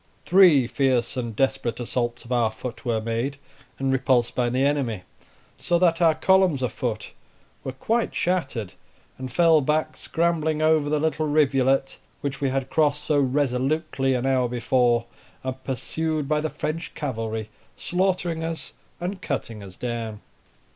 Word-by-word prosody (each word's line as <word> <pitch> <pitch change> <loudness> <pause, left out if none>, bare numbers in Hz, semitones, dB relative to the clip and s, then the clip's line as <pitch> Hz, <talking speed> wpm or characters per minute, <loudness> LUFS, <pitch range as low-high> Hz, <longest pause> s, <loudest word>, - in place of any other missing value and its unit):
Three 175 -8 +6
fierce 125 -2 +1
and 120 -4 -4
desperate 125 -2 0
assaults 120 -1 -2
of 120 - -12
our 120 -3 +2
foot 120 +2 -7
were 115 -3 0
made 115 +5 -2 0.4
and 135 0 0
repulsed 130 -2 +2
by 120 -1 +1
the 130 +3 +1
enemy; 130 -9 0 0.6
so 175 - +1
that 170 -1 +2
our 165 -2 +5
columns 190 -8 +3
of 125 - 0
foot 110 -4 -3 0.5
were 130 - -3
quite 225 - -1
shattered, 135 - -1 0.5
and 130 -1 -5
fell 165 +1 +5
back, 150 +3 0
scrambling 160 -2 0
over 155 -1 +3
the 150 0 +1
little 155 0 0
rivulet, 135 -3 +2 0.2
which 135 -1 -4
we 135 - +1
had 135 0 -2
crossed 150 -2 +2
so 150 -2 +2
resolutely 135 +1 0
an 125 +1 -1
hour 130 -2 +2
before, 120 0 +2 0.4
and 130 0 -5
pursued 155 +3 -2
by 150 0 +1
the 155 - -1
French 165 +3 -4
cavalry, 110 -6 -4 0.3
slaughtering 180 -3 0
us 165 0 -5 0.3
and 185 +2 -4
cutting 115 - -4
us 95 -2 -11
down. 115 -3 -4
135 Hz, 155 wpm, -24 LUFS, 120-155 Hz, 0.6 s, Three